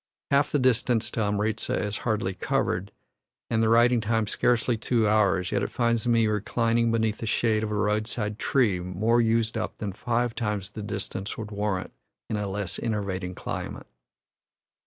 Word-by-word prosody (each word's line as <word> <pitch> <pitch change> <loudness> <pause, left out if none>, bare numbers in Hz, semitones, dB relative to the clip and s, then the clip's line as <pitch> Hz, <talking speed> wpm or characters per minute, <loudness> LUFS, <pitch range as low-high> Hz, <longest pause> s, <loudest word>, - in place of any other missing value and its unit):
Half 140 +1 +3
the - - +2
distance 120 -3 +2
to - - -4
Amritza 105 +1 0
is 105 0 -2
hardly 105 -4 -1
covered, 95 +1 -1 0.6
and 110 -1 +2
the 110 - +3
riding 120 +1 +5
time 110 0 +1
scarcely 120 +2 +1
two 115 0 +1
hours, 100 -4 +2
yet - - +1
it - - -1
finds 115 0 0
me 115 -1 +4
reclining 115 +2 +1
beneath 110 -1 0
the 115 - -4
shade 110 -1 +2
of 110 - -2
a 105 - -2
roadside 105 +1 -1
tree 110 -9 +2
more 100 +7 +1
used 115 0 +1
up 110 - -4
than 100 -3 -4
five 120 +2 -1
times 105 -4 -2
the 105 - -7
distance 100 -1 -4
would 110 -1 -6
warrant 100 -2 -2 0.4
in - - 0
a 105 -1 -2
less 95 -1 -3
enervating 100 -5 -3
climate. - - -5
110 Hz, 170 wpm, -26 LUFS, 105-115 Hz, 0.6 s, riding